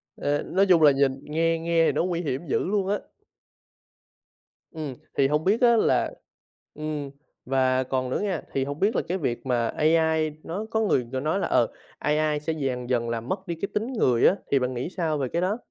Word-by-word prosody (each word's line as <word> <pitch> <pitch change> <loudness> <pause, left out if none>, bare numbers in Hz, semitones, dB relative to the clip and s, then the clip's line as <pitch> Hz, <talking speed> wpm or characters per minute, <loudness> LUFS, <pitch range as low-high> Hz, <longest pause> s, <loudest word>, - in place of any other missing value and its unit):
Ờ, 145 0 -1
nói 195 +2 +2
chung 175 -4 +5
là 150 - +8
nhìn 135 -1 +1
nghe 165 +2 0
nghe 165 0 +2
thì - - +3
nó - - 0
nguy 175 -1 -1
hiểm 150 0 -3
dữ - - +1
luôn 195 0 0
á. 205 +1 +1 1.7
Ừm, 155 -4 -5 0.2
thì 135 - +4
hông 150 +2 0
biết 210 +7 +2
á 235 -1 +6
là - - +2 0.6
ừm, 150 -2 -4 0.3
và 130 0 +2
còn 130 0 -2
nữa - - -1
nghe, 190 -6 -1
thì 135 - +1
hổng 145 +2 -5
biết 210 +4 +2
là - - +2
cái 180 - -1
việc 120 -7 -3
mà 120 -3 +1
AI 160 +1 +2
nó 195 +6 -4
có 220 - +1
người, 130 - +1
kiểu, 130 - -2
nói 155 +7 0
là, - - -1
ờ, 120 - +3 0.3
AI 150 0 +1
sẽ 160 +2 -2
dần 130 -5 -3
dần 120 -2 0
là 115 -1 -2
mất 190 - -4
đi 170 - -2
cái 200 - -2
tính 225 +5 -2
người 125 - +3
á, - - +4 0.2
thì 140 - +4
bạn 125 0 -1
nghĩ 125 +6 -3
sao 160 -4 0
về 135 -2 -1
cái 170 - +1
đó? 190 +4 0
155 Hz, 220 wpm, -25 LUFS, 135-180 Hz, 1.7 s, là